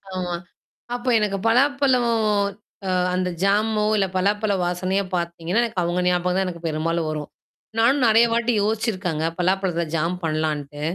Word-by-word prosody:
ஆமா. 180 -1 -2 0.6
அப்ப 245 +1 -7
எனக்கு 200 -2 0
பலாப்பழம் 260 0 +3 0.8
அ - - 0 0.2
அந்த 185 0 0
ஜாமோ 210 +1 +2
இல்ல 195 - +2
பலாப்பழ 205 +2 +1
வாசனையோ 185 +3 0
பாத்தீங்கன்னா, 170 +5 -1
எனக்கு 215 -6 -2
அவங்க 175 +1 0
ஞாபகம் 180 0 +1
தான் 190 - +1
எனக்கு 170 -1 -7
பெரும்பாலும் 160 +1 -1
வரும். 150 -1 -4 0.5
நானும் 255 +4 +3
நெறைய 225 +2 +6
வாட்டி 235 +1 +1
யோசிச்சிருக்கங்க. 200 -7 -1
பலாப்பழத்தல 180 -2 0
ஜாம் 165 +3 0
பண்ணலான்ட்டு. 155 -2 -2
185 Hz, 135 wpm, -23 LUFS, 170-220 Hz, 0.8 s, நெறைய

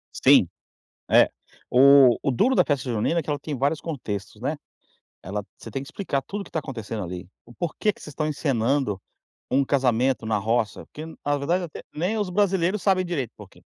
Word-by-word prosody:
Sim, - - +6 0.6
é, - - +6 0.4
o 135 -1 +7
o 140 - +1
duro 255 - +2
da - - +5
festa 135 -4 -1
junina, 115 +10 +1
é - - -6
que 150 - -5
ela 145 - 0
tem 145 0 -5
vários 140 +4 0
contextos, 110 - -5
né, - - -1 0.7
ela 100 +2 -4
você 115 - -10
tem 135 +5 -4
que - - -10
explicar 140 -9 -2
tudo 205 +1 -5
o - - -5
que - - -14
está 160 - -2
acontecendo 115 -6 -5
ali, 90 0 -7 0.2
o 120 - -15
porquê 175 - -1
que - - -21
vocês 150 - -9
estão 155 +2 -2
encenando 135 -6 0 0.5
um 135 +2 +3
casamento 130 -3 +1
na 110 -1 +1
roça, 110 +1 -1
porque 155 +1 -8 0.2
na 145 0 +2
verdade 170 +6 0
até 165 - -7
nem 185 +8 -1
os 205 -3 -1
brasileiros 190 0 +1
sabem 185 -2 +3
direito 140 -10 -3
o - - -65
porquê. 105 -3 -15
140 Hz, 205 wpm, -25 LUFS, 115-165 Hz, 0.7 s, o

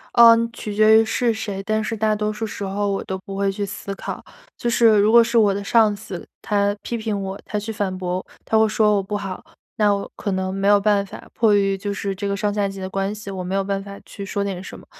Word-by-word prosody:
呃， 235 -1 +9 0.2
取 210 -3 -6
决 215 +1 +6
于 225 - 0
是 235 +1 +1
谁， 200 -3 -5
但 215 +2 0
是 225 - -3
大 215 0 +1
多 210 0 -1
数 225 +1 -4
时 205 - -6
候 200 +1 -1
我 195 - -1
都 190 - -3
不 195 +1 -8
会 200 0 +1
去 200 +1 -3
思 200 0 -6
考。 - - -6 0.4
就 240 - -1
是 230 -2 +5
如 210 +2 +4
果 235 0 +8
是 235 0 0
我 205 -3 +5
的 200 - -4
上 215 0 +3
司， 200 -3 -8
他 205 -1 +1
批 235 - -3
评 215 -2 -2
我， 195 +1 -5
他 210 - -3
去 210 +2 -4
反 200 -3 -2
驳， 180 0 -3 0.2
他 220 - +1
会 220 - +5
说 210 -1 +3
我 - - +1
不 205 +2 -4
好， 195 -2 -5 0.4
那 210 -1 +4
我 200 - -6
可 200 - -3
能 190 0 -2
没 195 0 -1
有 205 0 +6
办 200 -1 +2
法， - - -11
迫 215 -3 +3
于 195 -1 +2
就 200 +1 -3
是 200 0 -3
这 200 +1 -4
个 200 - -1
上 205 +1 -1
下 205 -1 0
级 195 -1 -7
的 185 - -4
关 195 +2 -2
系， 205 -1 -8
我 190 - -5
没 180 +2 -3
有 195 - +1
办 195 0 -2
法 200 0 -9
去 200 - -8
说 200 0 -2
点 190 -2 -4
什 - - -9
么。 - - -15
200 Hz, 290 characters per minute, -22 LUFS, 195-215 Hz, 0.4 s, 呃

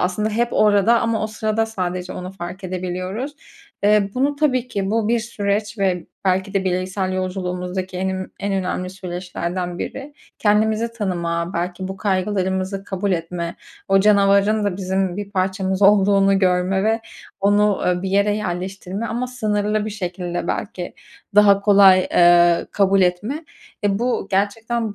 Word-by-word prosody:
aslında 210 +4 0
hep 235 +2 +1
orada 210 +2 +4
ama 225 -1 0
o - - 0
sırada 215 +1 -1
sadece 185 -3 -4
onu 180 +1 -7
fark 185 +1 -8
edebiliyoruz. 185 +8 -4 0.5
Eee, 205 -1 +4
bunu 280 +3 +1
tabii 255 -5 +1
ki 200 -2 -2
bu, 225 -1 +1
bir 235 -1 +2
süreç 210 -1 -2
ve 185 -3 0 0.2
belki 190 +2 0
de 190 -1 +1
bireysel 185 +1 -1
yolculuğumuzdaki 185 0 -3
en 190 +1 -1
im 190 0 -4
en 200 0 -2
önemli 185 -1 -2
süreçlerden 180 -1 -5
biri. 280 +2 -6 0.2
Kendimizi 220 +2 +2
tanıma, 170 -5 -2
belki 180 +2 -3
bu 190 - -6
kaygılarımızı 190 0 -1
kabul 195 0 -2
etme, 170 0 -3 0.3
o 195 0 +5
canavarın 200 +1 +4
da 195 -3 -1
bizim 190 -1 -1
bir 205 -1 -5
parçamız 190 0 -1
olduğunu 195 -1 +5
görme 185 +1 +1
ve 225 +1 +1 0.4
onu, 205 0 +3
ııı, 180 0 +1
bir 190 - -2
yere 200 +1 +2
yerleştirme 190 +2 -4
ama 240 +3 -2
sınırlı 215 -3 -1
bir 215 - -4
şekilde 180 -3 -4
belki 185 -4 -4 0.4
daha 200 -1 +6
kolay, 200 -2 +6
eee, 175 -1 +5
kabul 195 -1 +3
etme. 210 - -1 0.4
Eee, 200 -1 +1
bu, 245 +1 -1
gerçekten 220 +3 -1
195 Hz, 150 wpm, -21 LUFS, 185-210 Hz, 0.5 s, daha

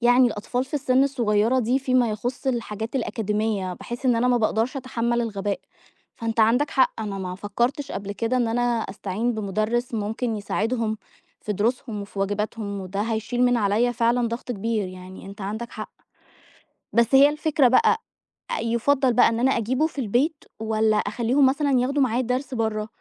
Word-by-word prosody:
يعني 245 +1 +5
الأطفال 240 +3 -2
في 270 - -9
السن 265 -1 +3
الصغيرة 235 -3 +2
دي، 250 +2 +2
فيما 255 -3 +2
يخص 240 +5 -4
الحاجات 230 -2 -2
الأكاديمية، 215 -5 -1
باحس 240 +7 -6
إن 245 -2 +4
أنا 245 +2 +2
ما 245 - +4
باقدرش 225 +3 0
أتحمّل 240 -2 -1
الغباء، 205 -3 -2 0.6
فأنت 230 -1 -1
عندك 245 +7 +3
حق 260 -3 +2
أنا 205 -3 -4
ما 180 -1 -4
فكّرتش 240 +9 -2
قبل 200 0 -4
كده 230 +4 -1
إن 240 -2 +1
أنا 240 +2 0
أستعين 225 -1 -1
بمدرّس 215 +4 -1
ممكن 220 +2 -2
يساعدهم 220 +1 -1 0.4
في 210 - -3
دروسهم 225 +1 -1
وفي 200 0 -10
واجباتهم، 205 +1 -2
وده 190 +1 -4
هيشيل 225 +2 0
من 245 0 +3
عليَّ 220 +3 +2
فعلًا 235 0 +1
ضغط 235 +2 -4
كبير. 215 -2 -2
يعني 185 +1 -10
أنت 200 +2 -10
عندك 215 +4 -4
حق. - - -7 1.0
بس 235 +2 +3
هي 275 +2 +8
الفكرة 300 -2 +2
بَقى 445 - +3 0.6
يُفَضّل 250 +3 +2
بَقى - - +5
إن 230 0 -2
أنا 260 +2 +3
أجيبُه 255 +7 +1
في 290 - -8
البيت 265 +8 0 0.2
والَّا 220 -1 +1
أخليهم 235 +7 +2
مثلًا 280 +2 +2
ياخدوا 275 +3 +1
معاه 245 -1 +1
الدرس 255 +2 -2
برّه؟ 220 -2 -1
230 Hz, 165 wpm, -24 LUFS, 210-255 Hz, 1.0 s, هي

